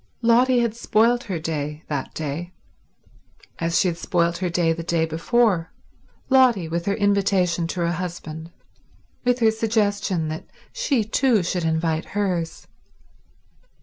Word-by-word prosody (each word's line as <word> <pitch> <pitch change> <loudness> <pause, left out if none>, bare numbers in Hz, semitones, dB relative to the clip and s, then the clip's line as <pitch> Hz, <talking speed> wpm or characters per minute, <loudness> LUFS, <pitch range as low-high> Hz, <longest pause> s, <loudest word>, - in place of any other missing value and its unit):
Lotty 245 +2 +4
had 235 -2 0
spoilt 235 +1 +2
her 190 -6 -3
day 150 -1 -4
that 140 -3 -4
day, 160 +4 -4 1.1
as 165 0 0
she 190 - +3
had 170 -1 -2
spoilt 170 -1 0
her 185 -1 -1
day 170 -1 +1
the 165 - -5
day 165 -1 0
before—Lotty, 205 - 0
with 170 +2 -3
her 200 - +2
invitation 195 -4 +1
to 175 +1 -4
her 170 0 +1
husband, 165 -2 -6 0.7
with 245 -1 +2
her 225 -1 +5
suggestion 205 -6 0
that 155 +1 -6 0.3
she 260 -6 +1
too 220 -1 +2
should 175 -1 -2
invite 160 0 0
hers. 180 -5 -2
175 Hz, 135 wpm, -23 LUFS, 165-220 Hz, 1.1 s, her